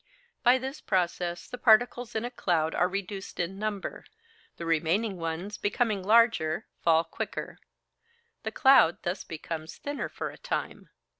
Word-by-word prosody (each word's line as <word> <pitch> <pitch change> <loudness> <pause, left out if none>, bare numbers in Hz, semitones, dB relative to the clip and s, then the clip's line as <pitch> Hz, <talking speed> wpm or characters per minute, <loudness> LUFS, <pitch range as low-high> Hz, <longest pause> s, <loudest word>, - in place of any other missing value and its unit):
By 250 0 +6
this 265 +3 -6
process 175 -2 -1
the 250 - -8
particles 240 +1 +3
in 220 +2 -1
a 245 - -4
cloud 165 -8 0
are 180 - +3
reduced 195 +1 -5
in 180 +3 -2
number; 210 -2 -4 0.5
the 170 - -6
remaining 170 +6 +1
ones, 170 +5 -4
becoming 210 -1 0
larger, 210 -6 +3
fall 165 -1 +4
quicker. 165 - -6 0.8
The - - -4
cloud 265 - +5
thus 180 +3 -2
becomes 160 0 -6
thinner 285 0 -4
for - - -5
a - - -15
time. - - -4
195 Hz, 145 wpm, -28 LUFS, 170-230 Hz, 0.8 s, By